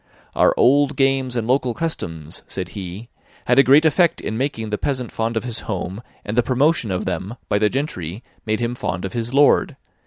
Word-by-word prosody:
* -, -, -30 dB
"Our -, -, +4 dB
old 145 Hz, +2 st, +4 dB
games 135 Hz, -2 st, +1 dB
and 115 Hz, -2 st, -1 dB
local 125 Hz, -1 st, +1 dB
customs," 80 Hz, -, -4 dB
said 90 Hz, -3 st, -4 dB
he, 100 Hz, +3 st, -7 dB, 0.4 s
"had 125 Hz, +2 st, +4 dB
a -, -, +8 dB
great 140 Hz, +5 st, +5 dB
effect 165 Hz, +2 st, +3 dB
in 110 Hz, -, -4 dB
making 115 Hz, -4 st, -2 dB
the 105 Hz, -, -1 dB
peasant 130 Hz, -4 st, -2 dB
fond 115 Hz, 0 st, -2 dB
of -, -, -1 dB
his 120 Hz, -2 st, -4 dB
home, 95 Hz, +1 st, -3 dB, 0.2 s
and 105 Hz, -, -3 dB
the 120 Hz, -, +5 dB
promotion 130 Hz, 0 st, +1 dB
of 90 Hz, -1 st, -2 dB
them, 95 Hz, +4 st, -3 dB
by 105 Hz, -, +2 dB
the 105 Hz, 0 st, +3 dB
gentry 115 Hz, -, -4 dB, 0.2 s
made 110 Hz, +1 st, -1 dB
him 120 Hz, 0 st, -1 dB
fond 95 Hz, -6 st, -3 dB
of 95 Hz, -, -5 dB
his 120 Hz, 0 st, -2 dB
lord. 140 Hz, +1 st, +4 dB
120 Hz, 210 wpm, -21 LUFS, 105-135 Hz, 0.4 s, a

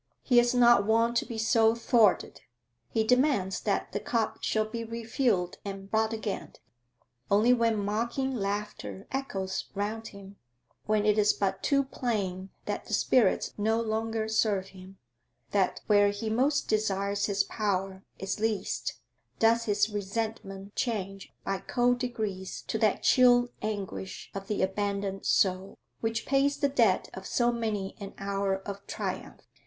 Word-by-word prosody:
He 245 Hz, -3 st, +5 dB
is 240 Hz, +1 st, +2 dB
not 240 Hz, -3 st, +6 dB
wont 230 Hz, +2 st, +3 dB
to -, -, 0 dB
be 230 Hz, -, -5 dB
so 225 Hz, 0 st, +3 dB
thwarted; 230 Hz, -3 st, +2 dB, 0.5 s
he 220 Hz, -, +1 dB
demands 250 Hz, -6 st, +2 dB
that 205 Hz, -, -1 dB
the -, -, -2 dB
cup 225 Hz, 0 st, -1 dB
shall 215 Hz, 0 st, +1 dB
be 230 Hz, +1 st, -5 dB
refilled 230 Hz, -4 st, -1 dB
and 195 Hz, -1 st, -7 dB
brought 220 Hz, 0 st, +2 dB
again; 220 Hz, -2 st, -4 dB, 0.8 s
only 215 Hz, +5 st, +5 dB
when 230 Hz, -2 st, +2 dB
mocking 235 Hz, +6 st, -1 dB
laughter 200 Hz, -, -4 dB
echoes 195 Hz, -8 st, -3 dB
round 215 Hz, +3 st, -3 dB
him, 200 Hz, 0 st, -12 dB, 0.5 s
when 215 Hz, -1 st, +2 dB
it 210 Hz, 0 st, +3 dB
is 210 Hz, 0 st, +4 dB
but 195 Hz, -1 st, -1 dB
too 280 Hz, -1 st, +2 dB
plain 200 Hz, -8 st, -3 dB, 0.2 s
that 205 Hz, -, -3 dB
the 215 Hz, -, 0 dB
spirits 245 Hz, +2 st, +2 dB
no 220 Hz, +2 st, +2 dB
longer 225 Hz, 0 st, -1 dB
serve 210 Hz, -3 st, +1 dB
him, 190 Hz, 0 st, -13 dB, 0.5 s
that 195 Hz, -2 st, +1 dB
where 205 Hz, -1 st, +5 dB
he 215 Hz, +2 st, -3 dB
most 275 Hz, +5 st, +1 dB
desires 200 Hz, -2 st, 0 dB
his 200 Hz, -1 st, +2 dB
power 195 Hz, -3 st, -2 dB
is 195 Hz, +2 st, -3 dB
least, 215 Hz, -3 st, -1 dB, 0.4 s
does 230 Hz, +1 st, +3 dB
his 205 Hz, -1 st, +2 dB
resentment 205 Hz, -1 st, -4 dB
change 195 Hz, -5 st, -3 dB
by 195 Hz, -1 st, -1 dB
cold 245 Hz, 0 st, +1 dB
degrees 215 Hz, -7 st, -4 dB
to -, -, -3 dB
that -, -, +2 dB
chill 245 Hz, -2 st, +5 dB
anguish 200 Hz, -3 st, -5 dB
of 195 Hz, 0 st, -6 dB
the 210 Hz, -2 st, 0 dB
abandoned 200 Hz, 0 st, -2 dB
soul, 190 Hz, 0 st, +1 dB, 0.2 s
which 225 Hz, 0 st, -2 dB
pays 280 Hz, +1 st, +2 dB
the 285 Hz, 0 st, +1 dB
debt 230 Hz, -9 st, +3 dB
of 190 Hz, 0 st, -8 dB
so 240 Hz, -1 st, +2 dB
many 215 Hz, -5 st, -3 dB
an 200 Hz, -1 st, -8 dB
hour 195 Hz, -1 st, -1 dB
of 200 Hz, 0 st, -6 dB
triumph. -, -, -5 dB
215 Hz, 150 wpm, -29 LUFS, 195-230 Hz, 0.8 s, not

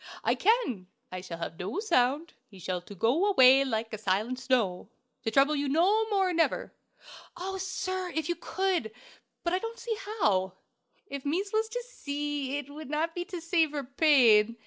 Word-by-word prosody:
I -, -, +3 dB
can. 390 Hz, -, +1 dB, 0.2 s
I 185 Hz, 0 st, -5 dB
shall 180 Hz, -2 st, -7 dB
have 165 Hz, -1 st, -6 dB
no 190 Hz, -, -3 dB
sound; 310 Hz, -, +1 dB
he 200 Hz, -, -15 dB
shall 180 Hz, 0 st, -3 dB
to 200 Hz, +3 st, -12 dB
go 250 Hz, -, +2 dB
away 265 Hz, -6 st, +7 dB
like 225 Hz, -4 st, -3 dB
a 215 Hz, -, -4 dB
silent 215 Hz, +5 st, -1 dB
snow, 240 Hz, -9 st, 0 dB, 0.3 s
to -, -, -1 dB
trouble 275 Hz, +6 st, +3 dB
you 285 Hz, -1 st, -1 dB
no 400 Hz, +9 st, +3 dB
more, 385 Hz, -3 st, +1 dB
never!" 330 Hz, -1 st, 0 dB, 0.6 s
"Oh, 385 Hz, +2 st, -4 dB
sir, 375 Hz, -1 st, -3 dB
if 320 Hz, -2 st, -1 dB
you 345 Hz, -, +1 dB
could! 350 Hz, -, -1 dB, 0.5 s
But 340 Hz, -, 0 dB
I 365 Hz, -, +2 dB
don't 455 Hz, +3 st, -6 dB
see 470 Hz, -2 st, -3 dB, 0.2 s
how!" 190 Hz, -, +2 dB, 0.5 s
"If 280 Hz, -8 st, -7 dB
mees 370 Hz, +8 st, -1 dB
was 440 Hz, 0 st, +1 dB
to -, -, -4 dB
see, 290 Hz, -, -3 dB
it 290 Hz, -2 st, -6 dB
would 300 Hz, -1 st, -9 dB
not 315 Hz, +3 st, -1 dB
be 350 Hz, 0 st, -4 dB
to 365 Hz, -3 st, -6 dB
save 330 Hz, -2 st, +1 dB
her 290 Hz, -2 st, -2 dB
pain. 245 Hz, -6 st, +4 dB
290 Hz, 185 wpm, -29 LUFS, 230-370 Hz, 0.6 s, away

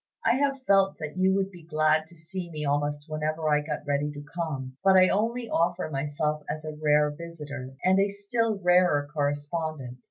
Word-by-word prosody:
I -, -, +5 dB
have 275 Hz, -1 st, 0 dB
felt 195 Hz, -3 st, +3 dB
that 155 Hz, -1 st, -6 dB
you 190 Hz, +1 st, +3 dB
would 195 Hz, 0 st, 0 dB
be 175 Hz, -2 st, -12 dB
glad 155 Hz, -1 st, +1 dB
to 170 Hz, -, -13 dB
see 175 Hz, +2 st, -6 dB
me 155 Hz, -2 st, -4 dB
almost 145 Hz, +1 st, -1 dB
whenever 155 Hz, +1 st, -2 dB
I 150 Hz, -1 st, +3 dB
got 150 Hz, 0 st, -5 dB
ready 145 Hz, +1 st, 0 dB
to 145 Hz, 0 st, -9 dB
come; 140 Hz, -7 st, -4 dB
but 190 Hz, -1 st, +6 dB
I 185 Hz, 0 st, +6 dB
only 230 Hz, +4 st, 0 dB
offer 175 Hz, -3 st, 0 dB
myself 150 Hz, +2 st, -1 dB
as 155 Hz, 0 st, -4 dB
a 155 Hz, -, -4 dB
rare 150 Hz, -1 st, +3 dB
visitor, 145 Hz, -5 st, -8 dB
and 190 Hz, +1 st, +4 dB
a 200 Hz, +1 st, +3 dB
still 215 Hz, +3 st, -1 dB
rarer 180 Hz, -5 st, +3 dB
correspondent. 145 Hz, -2 st, -2 dB
155 Hz, 190 wpm, -27 LUFS, 150-185 Hz, -, but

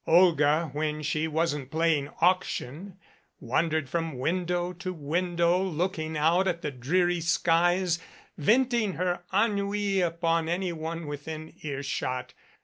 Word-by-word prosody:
Olga, 160 Hz, -3 st, +4 dB
when 150 Hz, 0 st, -2 dB
she 155 Hz, +1 st, 0 dB
wasn't 150 Hz, -4 st, -1 dB
playing 155 Hz, -2 st, +1 dB
auction, 180 Hz, 0 st, 0 dB, 0.4 s
wandered 155 Hz, +4 st, 0 dB
from 165 Hz, -2 st, -2 dB
window 175 Hz, +4 st, -1 dB
to 185 Hz, +1 st, -5 dB
window, 170 Hz, +2 st, +1 dB
looking 165 Hz, -3 st, -2 dB
out 170 Hz, +5 st, +3 dB
at 170 Hz, -1 st, -1 dB
the 150 Hz, -, -2 dB
dreary 175 Hz, +8 st, +1 dB
skies, 175 Hz, +1 st, +2 dB, 0.4 s
venting 235 Hz, -, +2 dB
her 175 Hz, 0 st, -1 dB
en 210 Hz, +3 st, +3 dB
nui 200 Hz, -1 st, 0 dB
on 165 Hz, -1 st, 0 dB
anyone 170 Hz, -2 st, -3 dB
within 155 Hz, +2 st, -6 dB
earshot. 135 Hz, -3 st, -3 dB
165 Hz, 120 wpm, -28 LUFS, 155-180 Hz, 0.4 s, Olga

